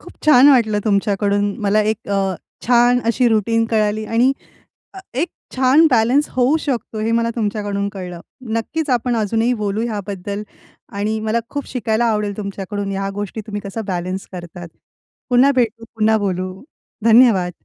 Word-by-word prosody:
खूप - - -13
छान 285 -2 +7
वाटलं 225 -6 +3
तुमच्याकडून 205 -1 +1 0.2
मला 205 +2 +3
एक 220 -1 -6
अ, 195 -2 0 0.3
छान 245 +1 +4
अशी 240 +1 +3
रुटीन 225 +1 +1
कळाली 215 -1 +1
आणि 235 +5 +2 0.6
अ, - - -9 0.2
एक 305 +8 0 0.3
छान 265 +5 +5
बॅलन्स 250 +5 +3
होऊ 255 +5 +2
शकतो, 235 -5 -3
हे 225 +1 0
मला 230 0 +1
तुमच्याकडून 205 -2 -2
कळलं. 180 -3 -7 0.4
नक्कीच 305 +6 -2
आपण 245 -1 +1
अजूनही 225 +2 +1
बोलू 205 +2 -1
ह्याबद्दल 200 -1 -5 0.6
आणि 215 +2 -1
मला 220 +1 0
खूप 285 -1 -4
शिकायला 235 -2 -1
आवडेल 210 -3 0
तुमच्याकडून 200 0 -5
ह्या 195 0 -2
गोष्टी 205 +2 -5
तुम्ही 205 -1 -4
कसं 200 +2 -5
बॅलन्स 185 +1 -3
करतात. 175 -1 -8 0.6
पुन्हा 250 +3 +5
भेटू, 230 -2 0
पुन्हा 220 0 +3
बोलू. 185 -2 -2 0.5
धन्यवाद. 220 -7 +4
220 Hz, 150 wpm, -19 LUFS, 200-240 Hz, 0.6 s, छान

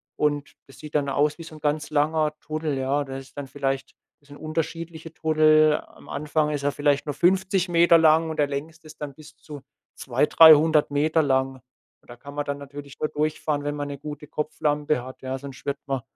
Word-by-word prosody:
Und 145 -1 -1
das 135 - -16
sieht 150 0 -10
dann 140 -2 +1
aus 145 +3 +1
wie 165 - -9
so 160 - -11
'n 155 - -12
ganz 150 0 -1
langer 155 +1 +1
Tunnel, 155 -2 -3
ja? 135 +2 0
Da 135 -1 -7
ist 135 0 -12
dann 145 - -5
vielleicht 135 0 -3 0.3
das 145 - -26
sind 145 - -11
unterschiedliche 160 +1 -5
Tunnel. 155 -1 +4
Am - - -18
Anfang 150 +1 -1
ist 145 -1 -3
er 145 - +1
vielleicht 145 -1 +1
nur 145 - -1
50 190 +1 +2
Meter 170 0 +6
lang 160 0 +4
und 160 - -5
der 145 - +3
längste 155 +3 -6
ist 155 0 -15
dann 145 -1 -5
bis 155 -1 -15
zu 145 -2 -11 0.3
200, 130 +2 0
300 155 -1 +7
Meter 155 +3 +2
lang. 135 -1 +1 0.5
Und - - -28
da 120 - -9
kann 140 +3 -11
man 145 0 -2
dann 140 0 -3
natürlich 140 0 -10
nur 155 - -1
durchfahren, 150 -1 -1
wenn 145 0 -2
man 145 -1 -4
'ne 140 -1 -7
gute 150 0 -8
Kopflampe 150 -2 -1
hat, 130 +1 -11
ja? 130 0 -4
Sonst 135 -1 -11
wird 140 0 -1
man 135 -2 -1
150 Hz, 215 wpm, -24 LUFS, 140-155 Hz, 0.5 s, 300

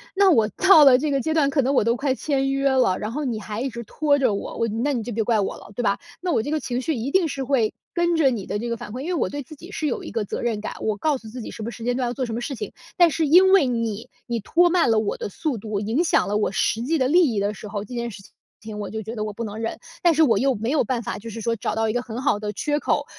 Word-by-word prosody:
那 395 0 +5
我 225 -11 +4
到 375 - +6
了 255 -2 +7
这 300 +2 -1
个 275 -1 +1
阶 315 +4 -1
段， 305 -3 +3
可 280 -1 +1
能 265 +3 +1
我 265 - +3
都 230 +2 +2
快 270 +1 0
签 270 0 -1
约 275 0 +1
了， 255 -8 +2
然 215 +1 -4
后 300 +5 -3
你 235 -4 -2
还 210 0 -5
一 270 - -1
直 235 -1 -7
拖 290 +4 +1
着 250 -6 +2
我， - - -5
我 230 - +1
那 230 +7 -1
你 240 - -1
就 235 +2 -5
别 220 +1 0
怪 225 0 +2
我 200 - -1
了， - - -14
对 - - -2
吧？ 200 -4 +1 0.2
那 360 0 -1
我 220 - +1
这 290 - -4
个 310 - +1
情 245 -4 -3
绪 315 +4 -1
一 245 0 -3
定 345 +1 +2
是 270 -1 -4
会， 250 -5 +1 0.2
跟 345 -1 +1
着 295 -4 +4
你 225 -7 -3
的 205 - -3
这 235 - -4
个 235 - -1
反 215 - -9
馈 245 - -6
因 280 - -5
为 360 - -1
我 335 - 0
对 285 - -5
自 310 - -12
己 340 +6 -12
是 310 - -2
有 260 - -2
一 - - -7
个 220 -2 -2
责 - - -4
任 230 -3 -1
感， 210 - -5
我 215 -2 -1
告 295 +6 +1
诉 225 -3 -12
自 245 +3 -7
己 - - -7
什 220 - -7
么 230 - -4
时 230 -1 -8
间 245 0 +1
段 255 0 -1
要 - - -3
做 255 +1 -2
什 225 -2 -4
么 235 - -3
事 275 - -4
情。 - - -6 0.2
但 345 -2 +6
是 315 +1 0
因 370 +5 +6
为 390 -7 +6
你， 230 -3 -2 0.2
你 235 -2 -3
拖 345 - +3
慢 335 -9 +3
了 220 - +4
我 215 -1 -1
的 - - -5
速 290 - -3
度， 210 -1 -3
影 225 - 0
响 340 - +2
了 205 - -1
我 210 -2 +1
实 215 +3 0
际 310 +7 0
的 260 -3 +2
利 330 -1 +4
益 205 - 0
的 200 +1 0
时 210 0 -9
候， 205 -1 -4
这 245 - -8
件 235 0 -3
事 200 - -10
情 - - -19 0.3
情 215 -1 -8
我 205 -2 -4
就 220 +2 -4
觉 220 +2 -7
得 215 - -2
我 215 - -3
不 230 - -5
能 210 -1 -6
忍。 225 0 -3 0.2
但 345 -1 +5
是 320 +1 +4
我 230 -8 +4
又 265 +4 +2
没 225 +4 -2
有 305 - +3
办 240 +1 -2
法， - - -4
就 230 +3 -8
是 225 +1 -7
说 230 +1 0
找 215 - -3
到 225 0 +1
一 - - -1
个 245 - 0
很 245 0 -6
好 205 - +1
的 210 0 -3
缺 295 +8 -1
口， - - 0
245 Hz, 360 characters per minute, -23 LUFS, 220-290 Hz, 0.3 s, 了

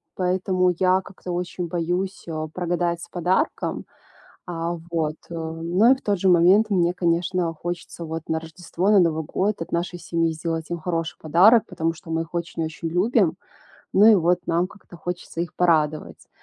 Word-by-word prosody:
Поэтому 185 0 +1
я 185 0 +3
как-то 185 -1 -9
очень 175 0 -3
боюсь, 180 +3 -2
э, 155 -1 -3
прогадать 175 -1 -1
с - - -9
подарком. 185 - -1 0.6
А, 170 0 -3
вот. 155 -2 -1 0.2
Э, 170 - -6
ну 165 +8 +2
и - - +3
в - - -18
тот 205 -3 0
же 190 - +2
момент 185 +5 +5
мне, 175 -2 +2
конечно, 175 0 0
хочется 175 +1 -6
вот 160 0 -5
на 160 0 0
Рождество, 175 +4 -2
на 205 - +6
Новый 160 -2 +1
год 200 +4 -1
от - - -8
нашей 175 +1 -2
семьи 165 -1 0
сделать 160 0 -4
им 170 - -2
хороший 165 -1 -2
подарок, 190 +9 +5
потому 165 -3 -1
что 165 0 -12
мы 160 0 0
их 165 +1 -12
очень 170 -1 -3
очень 160 +1 -5
любим, 180 0 +2 0.6
ну 205 +3 +6
и 225 - +9
вот 175 -1 +3
нам 170 +3 +1
как-то 195 -4 -15
хочется 175 0 -5
их 170 -2 -4
порадовать. 155 -3 0
175 Hz, 180 wpm, -23 LUFS, 165-185 Hz, 0.6 s, и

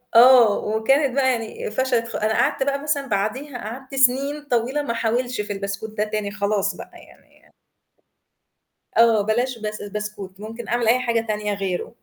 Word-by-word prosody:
آه، 240 -3 +7
وكانت 255 +5 +1
بقى 265 -2 +3
يعني 230 -3 -4
فَشَلت 245 0 0
خ 230 - -7
أنا 215 +1 0
قعدت 270 - +1
بقى 280 +1 -1
مثلًا 285 -2 -1
بعديها 245 +6 -2
قعدت 255 +5 -8
سنين 270 +3 +2
طويلة 245 +5 +1
ما 285 - -3
أحاولش 235 +1 -1
في 205 0 -4
البسكوت 200 +2 -5
ده 210 - +2
تاني 210 -1 -3
خلاص 200 -2 -1
بقى - - -10
يعني - - -19 1.5
آه 230 -2 +5
بلاش 240 +4 0
بس 210 0 -5
بسكوت، 205 -2 -6
ممكن 225 +2 -8
أعمل 240 -1 0
أي 240 +3 +4
حاجة 230 -2 0
تانية 210 -1 -1
غيرُه. 195 0 -3
230 Hz, 165 wpm, -22 LUFS, 210-255 Hz, 1.5 s, آه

